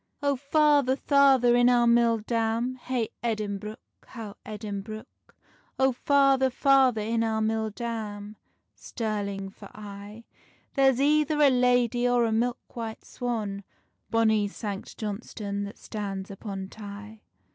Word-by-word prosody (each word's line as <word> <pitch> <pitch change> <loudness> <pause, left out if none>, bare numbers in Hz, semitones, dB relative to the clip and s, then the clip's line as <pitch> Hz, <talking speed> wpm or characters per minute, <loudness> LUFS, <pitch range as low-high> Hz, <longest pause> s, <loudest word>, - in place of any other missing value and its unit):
"Oh 285 -1 +2
father, 285 -1 +3
father, 270 -4 +4
in 245 0 +5
our 240 -1 +4
mill 235 -1 +4
dam, 230 +2 -1
Hey 250 -2 -3
Edinbruch, 215 -1 -3 0.3
how 220 -4 -8
Edinbruch, 215 +1 -6 0.7
Oh 265 0 +3
father, 270 0 +3
father, 260 -3 +3
in 225 +2 0
our 220 -1 0
mill 220 0 0
dam, 210 -2 -5 0.4
Stirling 200 -4 -4
for - - -13
aye: 205 +1 -10 0.5
There's 270 -2 +3
either 300 +1 +2
a 285 -2 +6
lady, 245 -1 +2
or 245 -1 +3
a 225 - 0
milk 240 +2 +1 0.2
white 225 -2 -6
swan, 215 -5 -4 0.5
Bonny 220 -1 +3
Sanct 200 -1 -6
Johnstonne 205 -1 -4
that 200 - -9
stands 195 -3 -5
upon 195 -1 -6
Tay." 210 +1 -10
225 Hz, 125 wpm, -27 LUFS, 210-250 Hz, 0.7 s, a